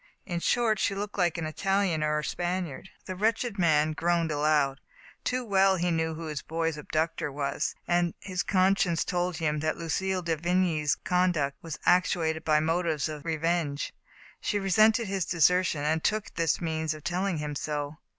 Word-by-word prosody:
In 175 -3 -3
short, 220 +2 +2
she 200 - +1
looked 205 +1 -5
like 175 -2 +2
an 165 - -3
Italian 195 0 0
or 150 0 0
Spaniard.*' 175 -1 -3 0.2
The 185 - -5
wretched 220 +1 0
man 155 -3 +3
groaned 165 +1 0
aloud. 145 -2 +1 0.4
Too 255 0 -1
well 195 -2 +4
he 175 -1 0
knew 160 -1 0
who 165 +1 -6
his 150 -2 -4
boy*s 165 -1 -2
abductor 155 +1 -2
was, 140 0 -2
and 175 -1 +1
his 185 -2 -3
con 190 0 +3
science 170 -4 0
told 180 -2 -1
him 150 -2 0
that 155 +1 -1
Lucille 185 +3 -1
de 165 -1 0
Vigny's 165 -3 +1
conduct 170 -6 0
was 165 -2 -6
actuated 165 -3 +2
by 155 -1 +3
motives 160 -1 0
of 150 -1 -7
revenge. 160 -2 -1 0.5
She 205 - -1
re 195 -1 -2
sented 220 +4 +5
his 195 -2 -1
desertion, 170 -2 +3
and 155 +2 0
took 215 -1 -1
this 165 -2 +1
means 160 -2 -2
of 155 - -12
tell 180 +3 -1
ing 180 -4 -1
him 150 -1 -3
so. 145 +1 -4
170 Hz, 180 wpm, -28 LUFS, 155-185 Hz, 0.5 s, sented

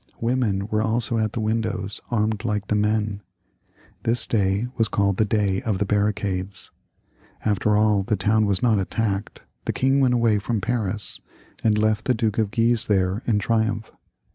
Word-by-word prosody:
Women 115 -5 0
were 110 0 +1
also 115 0 0
at 110 -1 -1
the - - -3
windows 110 -2 -2
armed 110 -2 0
like 105 -4 -2
the 105 - +2
men. 105 -1 0 0.8
This 115 +1 0
day 100 0 +1
was 115 -1 +2
called 100 -3 +1
the 110 - +3
Day 100 -2 +1
of 110 -4 -1
the 100 - 0
Barricades. 100 -2 -1 0.7
After 105 0 +2
all, 105 -2 +3
the 105 +3 0
town 105 +2 +2
was 100 +1 0
not 115 -4 +3
attacked, 100 +1 -2 0.2
the - - -1
king 135 +1 +2
went 130 -2 +3
away 115 -3 +3
from 110 +2 -1
Paris, 110 -2 -2 0.4
and 110 -2 +3
left 110 0 +1
the 125 - +2
Duke 110 -1 0
of 110 -2 +1
Guise 115 +1 +2
there 95 0 +1
in 110 -3 +3
triumph. 110 +1 0
105 Hz, 170 wpm, -23 LUFS, 100-115 Hz, 0.8 s, the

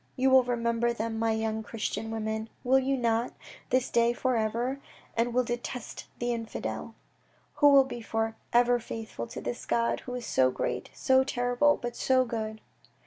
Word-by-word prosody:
You 265 0 +2
will 260 -1 +7
remember 235 -1 0
them, 225 0 -3
my 225 0 +2
young 220 0 -1
Christian 220 0 -4
women, 220 0 -3
will 260 +2 +4
you 270 +1 0
not, 230 0 0 0.4
this 255 0 +1
day 235 0 +3
for 255 +1 0
ever, 235 +5 -1 0.4
and 235 +1 +1
will 250 +1 +2
detest 240 0 -5
the 240 0 -1
infidel. 230 -1 -5 0.7
You 290 - +8
will 280 -1 +8
be 250 -3 -7
for 225 0 -2 0.2
ever 245 0 +4
faithful 220 - -6
to - - -7
this 120 0 -4
God 115 0 +1
who 250 - -6
is 245 -2 -5
so 130 0 +3
great, - - -3
so 260 0 +3
terrible, 245 +3 +2
but 240 0 -4
so 260 -1 +3
good 220 -2 -4
235 Hz, 175 wpm, -29 LUFS, 225-250 Hz, 0.7 s, You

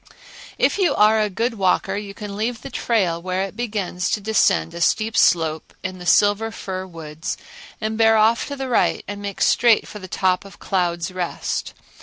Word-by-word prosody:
If - - +2
you 350 -7 +2
are 215 +1 +5
a 210 - +1
good 225 +3 -2
walker 195 +1 +1
you 200 -1 -6
can 205 0 -7
leave 225 +3 -3
the - - -7
trail 185 -8 0
where 185 +1 -1
it 195 +1 -6
begins 205 -6 -2
to - - 0
descend 200 - +2
a 170 - -6
steep 220 +5 +1
slope 160 -2 +2
in 185 0 -5
the 180 - -7
silver 205 +5 +4
fir 190 -4 -6
woods, 160 -2 -6 0.4
and 220 0 -3
bear 225 0 +5
off 220 +2 +3
to 285 - -5
the 270 -1 -4
right 245 - +1
and 205 0 -6
make 200 -1 -6
straight 235 -3 +4
for 210 - -9
the 185 - -9
top 185 +1 +1
of 200 - -13
Clouds' 175 -2 -1
Rest. 180 -2 -3
200 Hz, 195 wpm, -21 LUFS, 180-220 Hz, 0.4 s, are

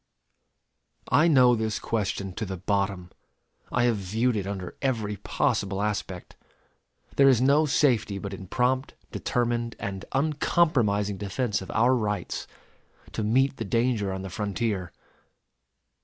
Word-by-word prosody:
I 150 +6 +5
know 130 -6 +6
this 110 -2 -1
question 100 -3 -2
to 110 - -4
the 95 -2 -4
bottom. 95 -1 -1 0.6
I 120 - +2
have 120 -3 +2
viewed 110 +6 0
it 100 -2 -2
under 95 -3 -5
every 110 -6 -1
possible 95 +1 -1
aspect. 100 -3 -3 0.8
There 140 -1 +7
is 130 -4 +4
no 140 +4 +4
safety 120 -7 +2
but 100 0 -6
in 95 -1 -8
prompt, 130 +5 0 0.2
determined, 120 -1 -1
and 95 -1 -5
uncompromising 135 - +1
defense 105 +2 -2
of 95 - -9
our 120 +3 +3
rights 105 -6 -2 0.6
to - - -3
meet 135 +6 +2
the - - -3
danger 115 -2 0
on 95 0 -4
the 95 - -7
frontier. 100 -2 -2
110 Hz, 135 wpm, -26 LUFS, 100-125 Hz, 0.8 s, There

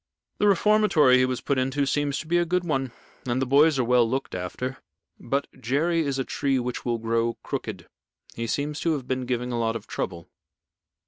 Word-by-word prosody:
The 205 - +3
reformatory 195 -9 +4
he 130 - +4
was 130 -1 -2
put 140 -2 0
into 135 +2 0
seems 145 0 0
to - - -5
be 175 +2 +3
a - - +3
good 180 +1 0
one, 135 -6 -1 0.4
and 120 +1 0
the 135 - +1
boys 145 +3 +4
are 130 - +2
well 120 -1 +3
looked 135 +2 -2
after. 110 +9 -4 0.4
But 140 +4 -1 0.2
Jerry 155 +8 +1
is 140 -3 -1
a 135 - 0
tree 135 -1 0
which 125 -1 -3
will 120 -1 0
grow 115 +1 0
crooked. - - -5 0.5
He 115 0 -4
seems 145 +5 -2
to 165 - +1
have 135 -4 -4
been 130 -1 -2
giving 125 0 -2
a 120 - -1
lot 115 0 0
of 110 -2 -6
trouble." 85 -2 -5
130 Hz, 205 wpm, -25 LUFS, 120-150 Hz, 0.5 s, reformatory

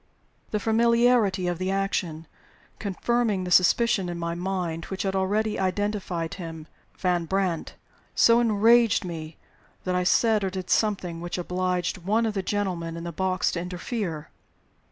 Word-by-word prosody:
The 210 - -1
familiarity 230 -3 +3
of 175 -1 -1
the 185 0 -1
action 190 -5 -1 0.5
confirming 210 0 0
the 180 - -5
suspicion 185 +1 +4
in 175 - -4
my 170 0 -2
mind 175 -2 -3
which 190 - -4
had 195 -1 -1
already 210 +3 0
identified 190 -3 -2
him 165 -3 -7 0.3
with - - -26
Van 175 -2 +1
Brandt 185 -2 -1 0.4
so 230 0 +6
enraged 225 -1 +4
me 160 -2 -7 0.5
that 185 - -1
I 180 0 +1
said 215 +3 +3
or 190 - 0
did 185 -1 -5
something 185 -6 0
which 175 +1 -4
obliged 180 +1 -1
one 215 +6 +1
of 220 - -1
the 195 - -1
gentlemen 180 -5 -2
in 165 - -6
the 170 - -4
box 185 +2 0
to 170 - -3
interfere. 180 -2 -4
185 Hz, 155 wpm, -26 LUFS, 175-210 Hz, 0.5 s, so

